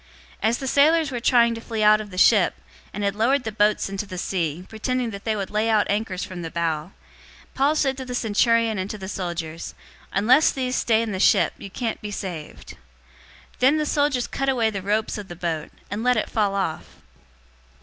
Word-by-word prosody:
027:030 220 - +3
As 235 - 0
the 270 - -5
sailors 305 +2 +4
were 245 - -3
trying 235 -1 +4
to 230 - -7
flee 225 -2 -3
out 215 0 +6
of 210 - -9
the 185 - -10
ship, 200 0 +5 0.4
and 205 - -5
had 200 0 0
lowered 245 +5 +2
the 220 - -3
boat 210 0 +2
into 195 +1 -4
the 185 -2 -7
sea, 175 -2 -2
pretending 245 +2 -2
that 200 -1 -9
they 220 -1 0
would 200 -2 -4
lay 215 +2 +1
out 215 -2 +3
anchors 205 -3 -2
from 180 -2 -7
the 165 - -5
bow, 165 0 -2 0.6
027:031 - - -32
Paul 280 +3 +2
said 270 -3 +1
to 260 - -6
the 250 -1 -5
centurion 230 -1 +2
and 185 +1 -3
to 215 - -5
the 190 -2 -7
soldiers, 170 -4 -5 0.4
"Unless 255 +9 +4
these 255 -1 -2
stay 225 -1 +2
in 225 - -4
the 190 - -3
ship, - - +4
you 200 - -8
can't 225 +2 -4
be 210 - -5
saved." 180 -7 -7
027:032 - - -11 0.8
Then 270 +5 +4
the 305 - 0
soldiers 285 -4 +1
cut 270 0 -2
away 235 -4 +2
the 200 -2 -4
ropes 210 +2 -1
of 205 - -8
the 175 - -8
boat, 165 -3 -3 0.2
and 205 +2 -3
let 250 -1 +3
it 215 - -2
fall 205 -3 +1
off. 190 -5 -2
215 Hz, 220 wpm, -23 LUFS, 190-245 Hz, 0.8 s, out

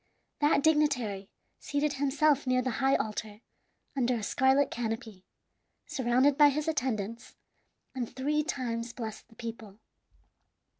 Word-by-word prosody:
That 295 -1 +3
dignitary 255 -11 +1 0.3
seated 290 0 -1
himself 285 0 +2
near 255 0 +2
the 255 - -1
high 270 0 +4
altar 215 0 -4 0.5
under 250 -2 +1
a 225 - -4
scarlet 265 +5 +3
canopy, 225 -4 -5 0.6
surrounded 260 +3 +2
by 295 -1 +8
his 295 +2 -2
attendants, 230 -7 -2 0.6
and 250 -3 -3
three 295 +3 0
times 240 -6 -3
blessed 220 -3 -7
the 225 - -21
people. 225 -3 -8
255 Hz, 120 wpm, -30 LUFS, 225-285 Hz, 0.6 s, by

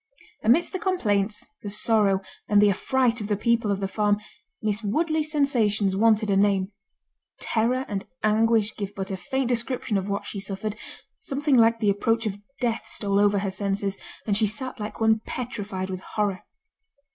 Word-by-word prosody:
Amidst 295 - +3
the 375 - -2
complaints, 210 - 0 0.2
the 205 - -5
sorrow, 210 -2 +2 0.3
and 205 -1 +5
the 205 0 +6
affright 245 +3 +1
of 205 - -4
the 205 -1 0
people 235 0 +1
of 200 0 -1
the 195 - 0
farm, 205 +1 +1 0.4
Miss 210 0 -1
Woodley's 310 +8 0
sensations 220 -9 +2
wanted 215 0 +3
a - - +3
name—terror 205 +5 -1
and 200 -2 -4 0.2
anguish 220 0 +3
give 200 -1 -5
but 195 -1 -4
a - - -1
faint 265 +8 -2
description 240 -3 0
of 190 +1 -5
what 200 0 -2
she 200 - -5
suffered—something 220 - -3
like 230 -1 +5
the 210 -3 +3
approach 225 +3 0
of 205 -1 -3 0.2
death 235 -3 -1
stole 200 -1 0
over 205 0 +4
her 195 -1 -1
senses, 195 0 -1 0.3
and 205 - +1
she 215 +1 +3
sat 255 +4 -3
like 210 0 -6
one 220 0 +4
petrified 205 -6 -5
with 185 - -4
horror. 200 -1 -2
210 Hz, 170 wpm, -25 LUFS, 200-230 Hz, 0.4 s, the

